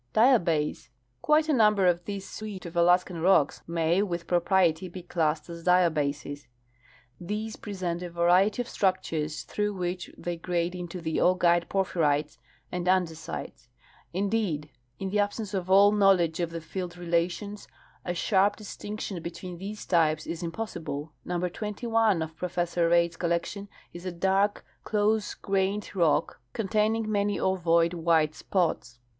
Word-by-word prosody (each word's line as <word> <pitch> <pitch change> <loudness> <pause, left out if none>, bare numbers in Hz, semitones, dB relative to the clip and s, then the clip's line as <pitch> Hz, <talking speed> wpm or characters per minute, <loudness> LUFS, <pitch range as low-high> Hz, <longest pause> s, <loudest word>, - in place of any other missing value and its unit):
Diabase. 175 - +3 0.3
Quite 305 +1 +3
a 310 - +2
number 210 -5 +4
of 175 -1 +2
this 200 -2 -5
suite 210 -4 -7
of 170 - -8
Alaskan 175 0 +3
rocks 180 -5 +3
may 170 +2 +1
with 175 -4 -2
pro 175 0 +2
priety 180 -2 +2
be 180 0 -8
classed 160 -3 -1
as 170 -1 -8
diabases. 150 -5 +1 0.7
These 210 +5 -4
present 185 -4 -4
a 180 - -5
variety 180 +7 +3
of - - -16
structures 165 -7 -1
through 210 -1 -2
which 180 -1 -3
they 175 -1 -4
grade 175 +1 -1
into 180 0 -6
the 160 -1 -2
augite 175 -2 +3
porphyrites 155 -6 0 0.3
and 180 0 -3
ande 185 -2 +3
sites. 125 -5 -8 0.4
Indeed, 190 -6 -1 0.3
in 190 -1 -4
the 210 - +1
absence 205 0 -1
of 185 -2 -2
all 200 +2 +7
knowledge 190 -6 +3
of 170 -2 0
the 165 0 -6
field 180 +2 -5
rela 170 0 +1
tions, 205 +3 -8 0.4
a 175 - -3
sharp 200 +3 +2
distinction 210 -3 -6
between 170 +1 -7
tliese 205 +3 -7
types 155 -3 +2
is 170 +1 -5
impossible. 165 -5 -5
Number 180 0 -1
21 210 -1 0
of 160 0 -8
Professor 175 -1 0
Reid's 170 -1 +3
collection 175 +4 -2 0.2
is 175 +2 -8
a - - -2
dark 195 +4 +1 0.2
close 215 0 +1
grained 195 +1 -1
rock 165 -6 +1
containing 215 +1 0
many 205 0 0
ovoid 170 -2 +2
white 160 -2 +2
spots. 160 -9 -1
180 Hz, 150 wpm, -27 LUFS, 170-200 Hz, 0.7 s, all